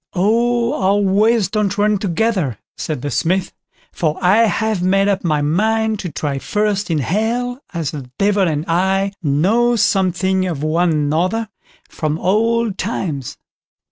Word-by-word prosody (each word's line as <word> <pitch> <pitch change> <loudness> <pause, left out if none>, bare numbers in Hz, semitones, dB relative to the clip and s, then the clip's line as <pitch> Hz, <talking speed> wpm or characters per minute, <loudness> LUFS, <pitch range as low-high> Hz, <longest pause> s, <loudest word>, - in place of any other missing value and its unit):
"Oh, 235 +6 +1
our 195 +2 +3
ways 205 +2 +2
don't 200 0 -1
run 210 0 +2
together", 185 - -1 0.2
said 150 -6 -4
the 145 - -3
Smith; 185 +2 0 0.4
"for 155 -3 -1
I 185 +3 +3
have 220 -3 -1
made 195 +2 +2
up 200 -1 0
my 155 -4 +1
mind 220 +7 +1
to 180 -5 -5
try 140 -1 -3
first 210 +3 -1
in 165 - +1
Hell, 230 - -1
as 165 -6 -3
the 140 -5 -8
Devil 200 -1 +2
and 155 -1 -2
I 190 +3 +1
know 195 +12 +2
something 190 -2 +1
of 155 -5 -4
one 165 +3 +1
another, 165 +9 0 0.4
from 155 -1 -3
old 220 +3 +1
times." 160 - -3
190 Hz, 145 wpm, -18 LUFS, 165-215 Hz, 0.4 s, our